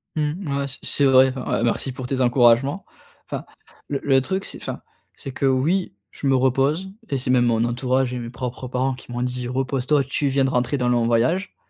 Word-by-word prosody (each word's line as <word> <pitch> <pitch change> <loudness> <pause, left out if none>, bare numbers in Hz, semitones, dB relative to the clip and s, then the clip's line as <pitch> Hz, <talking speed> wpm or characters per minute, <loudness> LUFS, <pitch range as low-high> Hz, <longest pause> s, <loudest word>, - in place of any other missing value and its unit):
Mmh, 150 0 -2
ouais, 140 - -2
c 135 - -7
c'est 140 - +2
vrai, 130 0 +5
ouais, 125 -3 -2
merci 120 +3 0
pour 130 0 -7
tes 130 0 -2
encouragements! 125 +7 +3 0.4
Enfin - - -5 0.4
le 145 - -1
le 135 -2 +4
truc 190 +8 -2
c'est, - - -6
enfin, - - -5 0.3
c'est 135 - -8
que 135 - 0
oui 145 - +1 0.2
je 140 - -4
me 135 - +4
repose, 135 +8 +1 0.2
et 140 - 0
c'est 125 0 -1
même 120 -1 +4
mon 115 -1 +2
entourage 125 +1 0
et 125 - -3
mes 115 -1 -6
propres 125 +1 -5
parents 130 +1 0
qui 125 -1 -11
m'ont 120 +1 -2
dit: 125 -1 -3
«repose-toi, 135 +2 0
tu 140 +2 -1
viens 135 0 +2
de 135 - 0
rentrer 125 +3 0
d'un 125 -1 0
long 120 -1 +2
voyage.» 125 +12 +1
130 Hz, 215 wpm, -22 LUFS, 125-140 Hz, 0.4 s, vrai